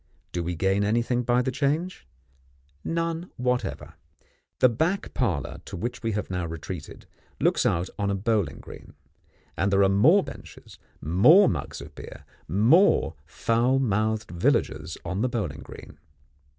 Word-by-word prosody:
Do 90 Hz, -, -2 dB
we 85 Hz, +1 st, -3 dB
gain 95 Hz, +4 st, +1 dB
anything 120 Hz, +3 st, +1 dB
by 125 Hz, +1 st, +2 dB
the 130 Hz, -, -1 dB
change? 150 Hz, +7 st, -2 dB, 0.8 s
None 165 Hz, +1 st, -2 dB
whatever. 125 Hz, -, -2 dB, 0.6 s
The -, -, +6 dB
back 160 Hz, -, -1 dB
parlour 90 Hz, -, -2 dB
to -, -, -7 dB
which 120 Hz, +7 st, -4 dB
we 115 Hz, -2 st, -1 dB
have 105 Hz, -2 st, -3 dB
now 90 Hz, -2 st, -2 dB
retreated, 80 Hz, 0 st, -8 dB, 0.3 s
looks -, -, +2 dB
out 85 Hz, +2 st, 0 dB
on 100 Hz, -1 st, 0 dB
a 100 Hz, -, 0 dB
bowling 100 Hz, -6 st, 0 dB
green; -, -, -13 dB, 0.6 s
and 95 Hz, -, 0 dB
there 100 Hz, 0 st, +4 dB
are 95 Hz, -, +4 dB
more 150 Hz, -, +5 dB
benches, -, -, -12 dB, 0.2 s
more 105 Hz, -, +6 dB
mugs -, -, -3 dB
of -, -, -11 dB
beer, -, -, -11 dB, 0.2 s
more 110 Hz, -, +4 dB
foul 115 Hz, +10 st, +1 dB
mouthed 110 Hz, -4 st, 0 dB
villagers 85 Hz, -1 st, 0 dB
on 95 Hz, +3 st, -2 dB
the 125 Hz, -, +1 dB
bowling 100 Hz, -, -3 dB
green. 75 Hz, -, -12 dB
110 Hz, 150 wpm, -26 LUFS, 90-130 Hz, 0.8 s, The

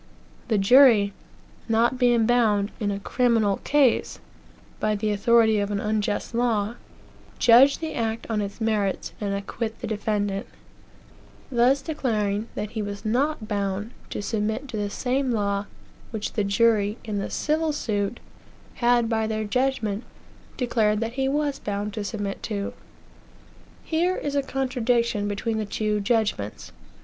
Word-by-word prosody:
The 220 Hz, -4 st, +2 dB
jury, 210 Hz, -1 st, +6 dB, 0.6 s
not 235 Hz, +3 st, +2 dB
being 240 Hz, -3 st, +4 dB
bound, 220 Hz, -4 st, +2 dB
in 210 Hz, -3 st, -1 dB
a 200 Hz, 0 st, -2 dB
criminal 225 Hz, -3 st, +2 dB
case, 280 Hz, -5 st, +2 dB, 0.6 s
by 215 Hz, 0 st, +1 dB
the 210 Hz, +1 st, -1 dB
authority 220 Hz, +1 st, +4 dB
of 200 Hz, 0 st, -1 dB
an 205 Hz, -1 st, -1 dB
unjust 210 Hz, +1 st, -1 dB
law, 230 Hz, -3 st, +1 dB, 0.6 s
judge 250 Hz, +4 st, +6 dB
the 320 Hz, -1 st, -4 dB
act 225 Hz, -1 st, -2 dB
on 220 Hz, -2 st, -1 dB
its 200 Hz, +1 st, -5 dB
merits, 215 Hz, -4 st, -1 dB
and 205 Hz, -1 st, -1 dB
acquit 220 Hz, +3 st, -4 dB
the -, -, -5 dB
defendant 205 Hz, -2 st, -2 dB, 1.0 s
thus 260 Hz, +3 st, +3 dB
declaring 220 Hz, -8 st, -1 dB
that 210 Hz, 0 st, -4 dB
he 220 Hz, -, -3 dB
was 205 Hz, 0 st, -6 dB
not 250 Hz, +1 st, 0 dB
bound 200 Hz, +1 st, -2 dB, 0.2 s
to -, -, -4 dB
submit 220 Hz, +5 st, -2 dB
to 240 Hz, -, -6 dB
the 205 Hz, -1 st, -1 dB
same 260 Hz, +5 st, -1 dB
law 200 Hz, -3 st, 0 dB, 0.4 s
which 220 Hz, -2 st, -4 dB
the 210 Hz, -, 0 dB
jury, 210 Hz, +1 st, +2 dB
in 210 Hz, -2 st, -3 dB
the 195 Hz, -, -3 dB
civil 310 Hz, +1 st, 0 dB
suit, 210 Hz, -6 st, -2 dB, 0.6 s
had, 240 Hz, -1 st, +4 dB
by 220 Hz, -1 st, 0 dB
their 215 Hz, 0 st, -2 dB
judgment, 220 Hz, -2 st, -1 dB, 0.5 s
declared 220 Hz, -4 st, +1 dB
that 230 Hz, +1 st, -2 dB
he 265 Hz, +1 st, 0 dB
was 290 Hz, 0 st, -1 dB
bound 205 Hz, 0 st, -3 dB
to 215 Hz, -2 st, -3 dB
submit 200 Hz, 0 st, -4 dB
to. 200 Hz, -3 st, -3 dB, 1.1 s
Here 345 Hz, +3 st, +1 dB
is 285 Hz, -, -3 dB
a 280 Hz, -, +3 dB
contradiction 245 Hz, -5 st, 0 dB
between 220 Hz, +2 st, -2 dB
the 215 Hz, -, -2 dB
two 210 Hz, +1 st, -1 dB
judgments. 205 Hz, -, -1 dB
220 Hz, 145 wpm, -25 LUFS, 205-245 Hz, 1.1 s, jury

